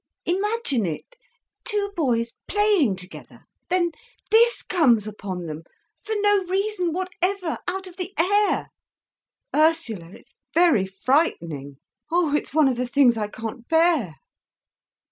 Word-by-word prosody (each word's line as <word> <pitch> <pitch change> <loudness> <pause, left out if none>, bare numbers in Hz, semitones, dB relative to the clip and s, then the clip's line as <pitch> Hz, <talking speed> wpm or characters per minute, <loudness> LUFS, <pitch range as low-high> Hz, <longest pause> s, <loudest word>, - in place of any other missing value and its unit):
Imagine 380 - 0
it, 170 - -6 0.5
two 415 -4 -2
boys 235 -7 0 0.2
playing 410 - +3
together—then 340 - -4 0.4
this 470 +2 +4
comes 250 - +3
upon 195 -4 -6
them, 155 -1 -6 0.4
for 440 - -3
no 410 -1 +3
reason 380 -1 -1
whatever—out 370 +1 -2
of 365 -1 -12
the 365 0 -4
air. 405 +5 +2 0.9
Ursula, 305 - +1
it's 270 +8 -16 0.2
very 330 - +4
frightening! 170 - -1 0.3
Oh, 335 -4 +2
it's - - -2
one 305 0 +4
of 255 -2 0
the 250 0 -1
things 255 -2 +4
I 215 -2 -2
can't 225 +2 -7
bear. 320 - +2
320 Hz, 120 wpm, -24 LUFS, -, 0.9 s, this